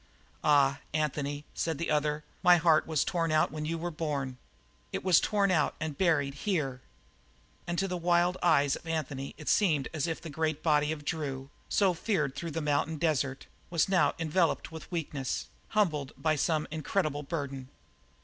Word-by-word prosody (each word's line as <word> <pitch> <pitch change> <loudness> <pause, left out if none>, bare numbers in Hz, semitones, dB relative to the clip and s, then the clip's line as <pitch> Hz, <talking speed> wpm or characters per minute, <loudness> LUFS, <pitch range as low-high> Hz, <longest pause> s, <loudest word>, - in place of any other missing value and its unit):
"Ah, 140 -2 +4 0.2
Anthony," 145 -1 -1
said 165 -3 -2
the 170 - -2
other, 150 0 +1 0.2
"my 180 -1 +7
heart 160 -2 +4
was 155 -3 +2
torn 165 -2 0
out 155 -2 +3
when 155 0 -4
you 165 +2 -2
were 175 +1 -3
born; 145 -5 -3 0.5
it - - -3
was 180 -3 +6
torn 200 -2 +2
out 155 -5 +2
and 155 -2 -3
buried 145 -5 +2
here." 140 -6 -2 0.9
And 175 0 -2
to 195 - +1
the 180 -1 -2
wild 175 +1 +2
eyes 145 -5 +4
of - - -11
Anthony 145 -4 -3
it 155 - -11
seemed 155 -10 +2
as 155 0 -1
if 165 - -2
the 165 - -8
great 155 0 -1
body 150 -1 +3
of 150 -2 -5
Drew, 140 -3 -3 0.2
so 195 -3 +3
feared 160 - -1
through 170 - -4
the 165 +1 -3
mountain 150 +1 0
desert, 140 -4 0 0.2
was 170 -3 +2
now 190 -2 +3
enveloped 165 +1 0
with 160 +2 -9
weakness, 145 -6 -3 0.2
humbled 155 -10 0
by 155 -1 +1
some 155 +1 0
incredible 155 -1 -1
burden. 140 -3 -5
155 Hz, 175 wpm, -30 LUFS, 145-170 Hz, 0.9 s, my